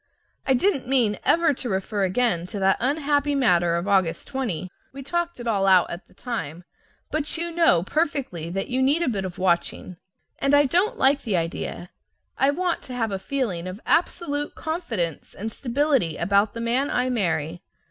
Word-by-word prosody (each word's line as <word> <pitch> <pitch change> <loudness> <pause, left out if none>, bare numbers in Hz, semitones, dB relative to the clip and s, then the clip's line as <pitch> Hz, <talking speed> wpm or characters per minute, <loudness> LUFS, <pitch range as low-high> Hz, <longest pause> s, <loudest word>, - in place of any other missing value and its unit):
I 265 - +4
didn't 275 -1 +1
mean 240 -6 +2
ever 330 -2 +3
to 250 -2 -5
refer 195 +1 -1
again 185 -3 0
to 205 - -6
that 195 -1 +3
unhappy 290 +1 +1
matter 175 -10 +3
of 170 +3 -2
August 185 -5 +1
20, 230 - -3 0.2
we 275 0 -9
talked 345 +2 -2
it 240 - -7
all 200 -4 +1
out 185 -2 +5
at 175 +2 -7
the - - -24
time, 175 - -5 0.5
but 305 +1 0
you 340 +1 -2
know 330 - +4
perfectly 265 - -2
that 195 +3 -3
you 255 +1 0
need 285 +6 +3
a - - -1
bit 200 -6 -1
of 180 -2 -6
watching. 180 0 0 0.4
And 275 +1 +3
I 290 0 +5
don't 380 - +1
like 275 +1 +3
the 210 -8 0
idea. 170 +1 -4 0.4
I 270 - +3
want 350 +4 0
to 250 - -6
have 225 -3 -1
a 195 - -2
feeling 195 -8 -2
of 185 +3 -6
absolute 295 -4 0
confidence 230 - -3
and 220 +3 -5
stability 255 - 0
about 200 +4 +2
the 230 - -4
man 245 +5 +1
I 255 +1 0
marry. 175 -6 -1
240 Hz, 185 wpm, -24 LUFS, 185-285 Hz, 0.5 s, out